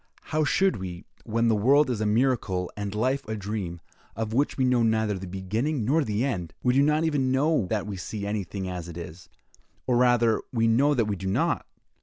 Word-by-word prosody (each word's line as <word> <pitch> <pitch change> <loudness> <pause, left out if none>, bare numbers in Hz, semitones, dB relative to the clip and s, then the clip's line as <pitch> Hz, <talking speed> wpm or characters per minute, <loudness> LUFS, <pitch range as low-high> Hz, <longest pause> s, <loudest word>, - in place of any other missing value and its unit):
How 155 0 +3
should 190 +6 +2
we, 90 -2 -7 0.2
when 115 +1 +1
the 115 - +3
world 140 +8 +4
is 110 -3 -2
a 110 - +1
miracle 105 -6 +1
and 100 0 -4
life 130 +5 0
a 110 - -3
dream, 100 -4 -4 0.3
of 110 -1 -3
which 140 +5 +1
we 130 - +2
know 125 -1 +3
neither 110 -2 +2
the 95 -1 -6
beginning 110 - -2
nor 150 +6 +2
the 110 0 -1
end! 90 - -3
We 125 - +3
do 135 - +4
not 150 +2 +3
even 145 -5 +1
know 140 - +2
that 105 0 -1
we 100 -2 -5
see 100 +3 -5
anything 100 -2 -3
as 90 -2 -5
it 85 - -8
is, 85 +1 -9 0.6
or 125 -2 +2
rather, 120 -2 +3
we 115 -2 +1
know 140 +6 +3
that 115 -4 +2
we 105 -1 -1
do 95 0 -6
not. 95 - 0
110 Hz, 215 wpm, -26 LUFS, 100-130 Hz, 0.6 s, world